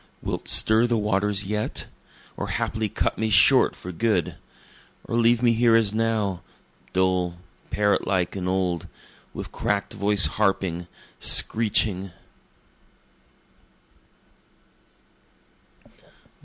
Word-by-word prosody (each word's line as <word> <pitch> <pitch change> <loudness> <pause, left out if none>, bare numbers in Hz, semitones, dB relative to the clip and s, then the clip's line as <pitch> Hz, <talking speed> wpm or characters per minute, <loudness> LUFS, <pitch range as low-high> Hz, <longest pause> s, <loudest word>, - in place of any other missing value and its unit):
Wilt - - -5
stir 110 +2 +3
the 120 -1 0
waters 105 -1 0
yet? 105 +2 -3 0.5
Or - - -5
haply 110 -1 -2
cut - - -2
me 110 0 -1
short 100 -1 +4
for 90 - -8
good? 95 -3 -1 0.7
Or - - -5
leave 120 +1 +2
me 120 -1 +4
here 115 0 +3
as 110 -3 +2
now, 110 -5 -1 0.5
Dull, 90 -2 0 0.3
parrot 105 -1 0
like 90 -1 -1
and 90 -1 -3
old, 90 -3 -2 0.4
with - - -8
crack'd 100 -1 -2
voice 100 -1 +4
harping, 95 -4 -1 0.3
screeching? 105 -4 +3
105 Hz, 100 wpm, -24 LUFS, 95-110 Hz, 0.7 s, short